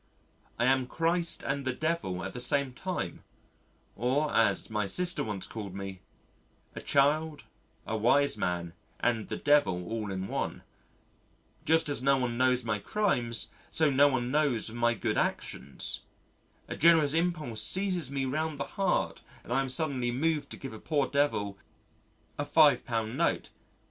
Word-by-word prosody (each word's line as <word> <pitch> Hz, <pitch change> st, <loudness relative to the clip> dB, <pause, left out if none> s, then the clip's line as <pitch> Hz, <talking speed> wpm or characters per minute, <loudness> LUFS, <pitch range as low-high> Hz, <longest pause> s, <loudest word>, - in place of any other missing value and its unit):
I 120 Hz, -, +2 dB
am 130 Hz, 0 st, +3 dB
Christ 165 Hz, +3 st, 0 dB
and 140 Hz, 0 st, -2 dB
the 130 Hz, -1 st, -1 dB
Devil 155 Hz, -, -2 dB
at -, -, -5 dB
the 125 Hz, -, -5 dB
same 140 Hz, -1 st, +1 dB
time 185 Hz, +7 st, -4 dB, 0.7 s
or 140 Hz, +5 st, 0 dB
as 110 Hz, -3 st, +2 dB
my 105 Hz, -2 st, -1 dB
sister 180 Hz, -, +1 dB
once 105 Hz, -3 st, -4 dB
called 100 Hz, -4 st, -7 dB
me 95 Hz, -1 st, -6 dB, 0.7 s
a -, -, -7 dB
child, 150 Hz, +2 st, +2 dB, 0.4 s
a 110 Hz, -, -2 dB
wise 140 Hz, +6 st, +3 dB
man, 85 Hz, -1 st, -2 dB, 0.3 s
and 115 Hz, -3 st, 0 dB
the -, -, -3 dB
Devil 145 Hz, -12 st, +2 dB
all 110 Hz, -3 st, -3 dB
in 95 Hz, 0 st, -3 dB
one. -, -, -3 dB, 1.0 s
Just 160 Hz, 0 st, +3 dB
as 145 Hz, -3 st, -2 dB
no 140 Hz, +1 st, +4 dB
one 125 Hz, -2 st, -1 dB
knows 125 Hz, 0 st, +2 dB
my 110 Hz, -2 st, -1 dB
crimes 120 Hz, -, -1 dB, 0.2 s
so 155 Hz, -2 st, +2 dB
no 140 Hz, +2 st, +6 dB
one 125 Hz, -3 st, 0 dB
knows 140 Hz, -7 st, +1 dB
of 110 Hz, -, -9 dB
my 120 Hz, 0 st, +2 dB
good -, -, -1 dB
actions. 65 Hz, +1 st, -3 dB, 0.7 s
A -, -, -5 dB
generous 160 Hz, -3 st, +5 dB
impulse 155 Hz, -9 st, -1 dB
seizes 185 Hz, -, +1 dB
me 135 Hz, -1 st, -1 dB
round 155 Hz, +2 st, -2 dB
the -, -, 0 dB, 0.2 s
heart 195 Hz, -, +1 dB, 0.2 s
and -, -, -4 dB
I 135 Hz, -, +3 dB
am 135 Hz, -, -3 dB
suddenly 130 Hz, -4 st, -1 dB
moved 145 Hz, +3 st, 0 dB
to -, -, -8 dB
give 135 Hz, -4 st, -7 dB
a 110 Hz, -, -9 dB
poor 145 Hz, 0 st, 0 dB
devil 115 Hz, -9 st, 0 dB, 0.8 s
a -, -, +1 dB
£5 120 Hz, -8 st, +3 dB
note. -, -, 0 dB
135 Hz, 160 wpm, -30 LUFS, 115-150 Hz, 1.0 s, no